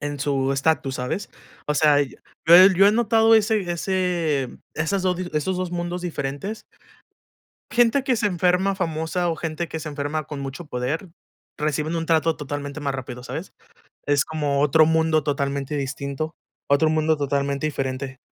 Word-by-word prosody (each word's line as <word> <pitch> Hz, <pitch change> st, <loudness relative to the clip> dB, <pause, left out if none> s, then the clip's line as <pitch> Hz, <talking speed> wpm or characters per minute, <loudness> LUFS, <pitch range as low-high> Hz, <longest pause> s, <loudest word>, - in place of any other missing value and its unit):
en 145 Hz, 0 st, -4 dB
su 135 Hz, -1 st, 0 dB
estatus, 140 Hz, 0 st, 0 dB
¿sabes? 125 Hz, +10 st, -3 dB, 0.4 s
O 150 Hz, -, 0 dB
sea, 145 Hz, -1 st, +4 dB
y 140 Hz, -3 st, -3 dB, 0.3 s
yo 165 Hz, -, +8 dB
he 185 Hz, +2 st, +9 dB
yo 195 Hz, +2 st, +6 dB
he 205 Hz, -, +5 dB
notado 225 Hz, 0 st, +4 dB
ese 215 Hz, -4 st, +2 dB
ese 170 Hz, -6 st, 0 dB, 0.3 s
esas 185 Hz, +5 st, -1 dB, 0.3 s
esos 180 Hz, +5 st, 0 dB
2 185 Hz, -1 st, -2 dB
mundos 175 Hz, 0 st, -3 dB
diferentes 175 Hz, +4 st, -4 dB, 1.1 s
gente 240 Hz, +3 st, +3 dB
que 255 Hz, -2 st, +1 dB
se 220 Hz, -2 st, +1 dB
enferma 185 Hz, +1 st, +2 dB
famosa 170 Hz, 0 st, -1 dB
o 165 Hz, -, -1 dB
gente 165 Hz, +1 st, -4 dB
que 160 Hz, -, -5 dB
se 155 Hz, -, -6 dB
enferma 145 Hz, +1 st, -3 dB
con 150 Hz, -1 st, -7 dB
mucho 135 Hz, +4 st, -6 dB
poder, 140 Hz, +8 st, -3 dB, 0.5 s
reciben 150 Hz, +2 st, -1 dB
un 165 Hz, -1 st, -1 dB
trato 160 Hz, -1 st, +2 dB
totalmente 145 Hz, 0 st, -5 dB
más 140 Hz, -1 st, -1 dB
rápido, 125 Hz, -2 st, -6 dB
¿sabes? -, -, -7 dB, 0.5 s
Es 145 Hz, -1 st, +3 dB
como 145 Hz, -3 st, -1 dB
otro 155 Hz, +2 st, +5 dB
mundo 160 Hz, -2 st, +2 dB
totalmente 140 Hz, 0 st, -2 dB
distinto, 140 Hz, +3 st, -4 dB, 0.3 s
otro 140 Hz, +3 st, +4 dB
mundo 155 Hz, 0 st, +2 dB
totalmente 140 Hz, 0 st, -1 dB
diferente. 135 Hz, -2 st, -4 dB
155 Hz, 160 wpm, -23 LUFS, 140-175 Hz, 1.1 s, he